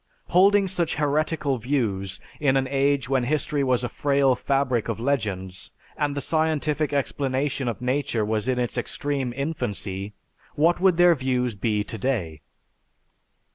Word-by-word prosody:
Holding 195 +2 +5
such 175 -3 -1
heretical 150 -2 0
views 105 -7 -1 0.2
in 135 -2 +3
an 135 -1 0
age 140 -1 +1
when 135 -1 +1
history 145 +1 0
was 125 -2 +1
a - - 0
frail 140 0 +2
fabric 130 -2 0
of 115 - -2
legends, 100 -8 -2 0.3
and 145 -1 -1
the - - -1
scientific 155 -1 0
explanation 135 -1 -1
of 115 -3 -3
nature 125 -3 0
in 110 +4 0
its 120 -1 -1
extreme 140 -3 -2
infancy, 105 -8 -4 0.4
what 165 +4 +3
would 185 -3 +4
their 175 0 +6
views 125 -4 -1
be 105 +1 -1
today? 105 - -3
135 Hz, 135 wpm, -24 LUFS, 115-145 Hz, 0.4 s, their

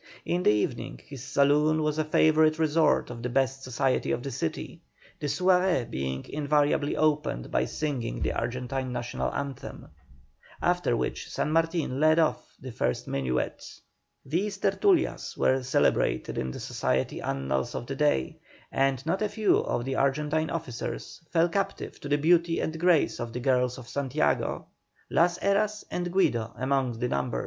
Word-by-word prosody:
In 175 +1 0
the - - +4
evening 105 -11 -1
his 135 -3 -9
saloon 145 +3 +3
was 150 0 0
a - - +3
favourite 155 0 +4
resort 160 -4 +2
of 120 -1 -7
the 125 - -2
best 135 +1 0
society 130 +1 0
of 120 - -1
the 140 - -4
city, 80 -9 -4 0.4
the 150 - -2
soirée 180 -2 +2
being 65 0 -3
invariably 145 0 +1
opened 150 - 0
by - - +2
singing 140 -7 -3
the - - -1
Argentine 125 +2 -3
National 120 -1 -2
Hymn, 140 -2 -6 0.7
after 175 -9 +1
which - - -3
San - - -1
Martin 165 -4 0
led 155 +1 +5
off 160 -2 0
the 130 - -8
first - - -2
minuet. 65 -2 -2 0.6
These 190 +8 -1
"tertulias" 320 - +1
were 130 0 +2
celebrated 130 +1 +1
in 65 - -2
the - - -6
society 65 0 -1
annals 65 -1 -2
of 120 - -4
the 135 - -5
day; 140 - +1 0.3
and 135 -1 +1
not 180 +5 0
a 210 - +1
few 210 0 +2
of 120 - -2
the 135 0 -2
Argentine 150 +3 +1
officers 150 -5 -5
fell 165 0 +3
captive 195 +3 -3
to 145 - -7
the 145 - +3
beauty 165 +2 +3
and 160 0 -3
grace 175 -2 +3
of 120 -1 -5
the 125 - -3
girls 125 -1 +1
of 125 -3 -10
Santiago, 140 +3 0 0.5
Las 175 +1 +3
Heras 210 +2 +1
and 175 0 -2
Guido 120 - +1
among 130 -2 0
the 125 +1 -1
number. 125 0 -1
145 Hz, 160 wpm, -27 LUFS, 125-165 Hz, 0.7 s, led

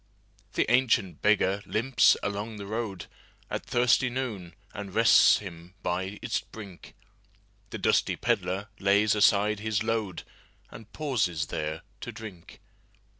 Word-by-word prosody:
The - - +1
ancient 115 -9 +2
beggar 100 -2 +2
limps 115 +4 +3
along 105 +2 -3
the 100 - -7
roadAt 100 -4 -6
thirsty 125 +1 +2
noon, 110 -10 -5 0.2
and 100 -2 -7
rests 115 0 +6
him 90 -2 -10
by 95 +3 -2
its - - 0
brink; 100 -5 -12 0.7
The - - -5
dusty - - +2
pedlar 95 +3 -1
lays 100 +2 +3
aside 105 0 +3
his 110 0 -1
load, 110 -6 -2 0.5
And 110 -1 -12
pauses 100 - -1
there 80 0 -4 0.2
to - - -6
drink. 100 -7 -11
105 Hz, 125 wpm, -27 LUFS, 95-110 Hz, 0.7 s, rests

